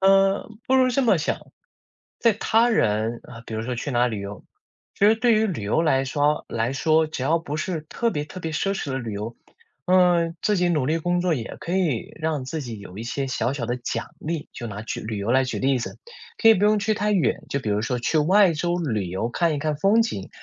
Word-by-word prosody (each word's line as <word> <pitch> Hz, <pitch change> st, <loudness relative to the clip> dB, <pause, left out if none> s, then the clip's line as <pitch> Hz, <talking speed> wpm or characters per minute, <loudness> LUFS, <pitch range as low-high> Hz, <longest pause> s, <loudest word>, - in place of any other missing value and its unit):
嗯， 195 Hz, +2 st, +3 dB
不 260 Hz, -, +2 dB
如 255 Hz, -1 st, +4 dB
这 270 Hz, +3 st, +1 dB
么 225 Hz, -5 st, +4 dB
想。 -, -, -3 dB, 0.7 s
在 230 Hz, -, +4 dB
他 225 Hz, +3 st, +2 dB
人， 110 Hz, -, +1 dB
呃， 115 Hz, -, -11 dB
比 110 Hz, -, -6 dB
如 110 Hz, -, -2 dB
说 125 Hz, +1 st, -3 dB
去 140 Hz, +4 st, -4 dB
哪 120 Hz, -, +2 dB
儿 125 Hz, -, +3 dB
旅 110 Hz, -3 st, -4 dB
游 100 Hz, +1 st, -8 dB, 0.5 s
其 200 Hz, -, +4 dB
实 220 Hz, -, +6 dB
对 235 Hz, +1 st, +3 dB
于 220 Hz, +1 st, +3 dB
旅 170 Hz, -, -3 dB
游 105 Hz, +10 st, +1 dB
来 135 Hz, -4 st, +2 dB
说 145 Hz, +2 st, +1 dB
来 115 Hz, +2 st, -1 dB
说， 155 Hz, +3 st, +2 dB
只 155 Hz, -4 st, -5 dB
要 160 Hz, +5 st, +2 dB
不 150 Hz, -2 st, -5 dB
是 160 Hz, 0 st, -2 dB
特 230 Hz, +9 st, -1 dB
别 150 Hz, -7 st, -2 dB
特 185 Hz, +5 st, -9 dB
别 165 Hz, -, -3 dB
奢 195 Hz, +6 st, -1 dB
侈 145 Hz, -, -4 dB
的 130 Hz, -, -1 dB
旅 115 Hz, -4 st, -5 dB
游， 105 Hz, +3 st, -5 dB, 0.5 s
嗯， 175 Hz, -2 st, +3 dB
自 210 Hz, -1 st, +2 dB
己 180 Hz, 0 st, +2 dB
努 155 Hz, -6 st, +1 dB
力 155 Hz, +5 st, +1 dB
工 175 Hz, +2 st, 0 dB
作 180 Hz, -1 st, +1 dB
也 120 Hz, -7 st, -4 dB
可 170 Hz, -, -5 dB
以 160 Hz, -12 st, 0 dB
让 155 Hz, -4 st, -2 dB
自 155 Hz, +5 st, -4 dB
己 115 Hz, -6 st, -7 dB
有 95 Hz, 0 st, -10 dB
一 115 Hz, -, -5 dB
些 135 Hz, +3 st, -3 dB
小 130 Hz, 0 st, -1 dB
小 130 Hz, -4 st, -3 dB
的 120 Hz, +1 st, -1 dB
奖 120 Hz, -1 st, -4 dB
励， 160 Hz, -1 st, -4 dB
就 120 Hz, -, -6 dB
拿 105 Hz, -1 st, -6 dB
举 110 Hz, -, -4 dB
旅 110 Hz, 0 st, -5 dB
游 100 Hz, +4 st, -2 dB
来 130 Hz, +1 st, +4 dB
举 125 Hz, -, -3 dB
例 135 Hz, 0 st, +2 dB
子。 120 Hz, -, -6 dB, 0.5 s
可 225 Hz, -, +7 dB
以 225 Hz, -, +9 dB
不 200 Hz, -, +1 dB
用 210 Hz, 0 st, +4 dB
去 215 Hz, +1 st, +1 dB
太 210 Hz, 0 st, 0 dB
远， 185 Hz, -5 st, +1 dB
就 140 Hz, -, -1 dB
比 110 Hz, -, -3 dB
如 105 Hz, +1 st, +1 dB
说 125 Hz, +1 st, -2 dB
去 155 Hz, +6 st, +1 dB
外 185 Hz, +4 st, +5 dB
州 175 Hz, +3 st, -1 dB
旅 110 Hz, -, -1 dB
游 95 Hz, +6 st, -2 dB
看 165 Hz, +6 st, +1 dB
一 145 Hz, -, -3 dB
看 155 Hz, 0 st, -1 dB
风 200 Hz, +9 st, +4 dB
景， 100 Hz, -, -4 dB
155 Hz, 270 characters per minute, -24 LUFS, 120-185 Hz, 0.7 s, 以